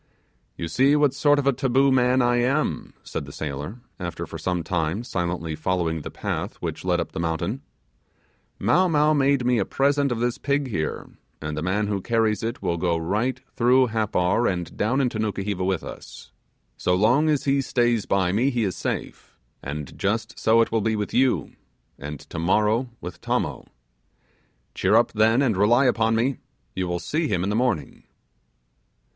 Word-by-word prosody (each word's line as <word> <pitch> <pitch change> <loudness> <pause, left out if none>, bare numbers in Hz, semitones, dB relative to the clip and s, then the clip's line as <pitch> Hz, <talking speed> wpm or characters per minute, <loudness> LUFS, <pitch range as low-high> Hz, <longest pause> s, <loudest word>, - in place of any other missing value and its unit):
'You 85 - -3
see 135 - +3
what 145 -3 +3
sort 145 +1 +3
of 145 - 0
a 140 - +4
taboo 135 +1 +2
man 125 0 +3
I 120 0 +2
am,' 135 +5 0
said - - -5
the - - -10
sailor, 75 - -6 0.2
after 85 -2 -4
for - - -8
some 90 -2 -1
time 85 +5 -1
silently 85 -7 -3
following 80 0 -1
the - - -6
path - - -4
which - - -5
led 90 -1 +1
up 85 - -3
the - - -5
mountain. 80 -1 -2 1.0
'Mow 185 +1 +3
Mow 150 -1 +3
made 140 -3 +2
me 125 -2 +3
a - - +2
present 140 +4 +1
of 120 - -1
this 120 0 -1
pig 140 -1 0
here, 80 -8 -3 0.3
and 75 0 -4
the 75 - -3
man 95 +5 0
who 100 -2 -2
carries 110 -1 +1
it 115 +2 -4
will 85 - 0
go 85 -1 0
right 110 +10 -1
through 125 +1 +4
Happar, 110 -1 +1
and 90 -2 -5
down 120 +6 +1
into 120 -4 -1
Nukuheva 100 -3 -2
with 95 -2 -1
us. - - -10 0.5
So 90 - +1
long 125 +11 +3
as 150 -3 +1
he 140 0 +2
stays 120 -4 +1
by 95 -2 +2
me 115 +8 +2
he 120 -4 0
is 95 -4 -1
safe, - - -5 0.2
and 70 0 -6
just 110 +3 -2
so 115 +1 +4
it 115 - 0
will 115 -1 +1
be 110 +1 0
with 105 -1 -3
you, 130 0 +2 0.5
and 75 0 -6
tomorrow 105 +8 0
with 90 0 -8
Tommo. - - -2 1.1
Cheer - - +2
up, 115 - +4
then, 115 +4 +3
and 120 -6 +2
rely 115 +7 +4
upon 115 -2 +2
me, 125 +3 +1 0.4
you 95 -1 -2
will 90 0 -1
see 155 - -1
him 90 -8 0
in 100 - -1
the - - 0
morning. 120 -9 -1
110 Hz, 185 wpm, -24 LUFS, 90-130 Hz, 1.1 s, a